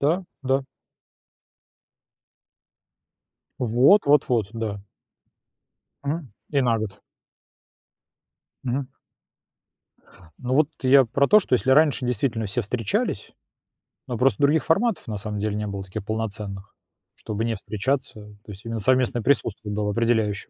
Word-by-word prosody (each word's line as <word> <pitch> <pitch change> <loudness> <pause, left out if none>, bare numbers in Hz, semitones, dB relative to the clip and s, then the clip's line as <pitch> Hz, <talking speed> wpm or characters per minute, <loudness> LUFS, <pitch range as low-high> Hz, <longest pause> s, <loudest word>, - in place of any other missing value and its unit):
Да, 165 +7 +2 0.2
да. 135 +1 +1 3.0
Вот, 125 - +4
вот, 145 0 +4
вот. 115 -5 +1
Да. 110 -3 -4 1.2
Мгм. 145 -3 -3 0.2
И 140 -2 +2
на 115 -2 +2
год. 100 -2 -6 1.6
Мгм. 130 +2 -1 1.5
Ну 130 +1 -2
вот, 150 0 +4
я 135 0 +6
про 140 +5 +1
то, 210 0 +7
что 130 - 0
если 130 +2 +1
раньше, 145 -2 +4
действительно, 115 -2 -1
все 105 +5 -2
встречались, 115 0 -2 0.8
но 120 - -3
просто 125 -3 +2
других 150 +2 +4
форматов, 200 +3 +1
на 105 -2 -3
самом 105 +1 -5
деле, 105 0 -1
не 105 0 -3
было 100 -1 -5
таких 95 +2 -7
полноценных, 105 -3 -5 0.4
чтобы 110 +1 -4
не 115 -1 -1
встречаться, 110 +7 -2 0.3
то 105 - -9
есть 100 +3 -12
именно 115 -1 -3
совместное 125 +1 +2
присутствие 110 -6 0
было 105 0 -1
определяюще. 110 -2 0
115 Hz, 125 wpm, -24 LUFS, 105-135 Hz, 3.0 s, то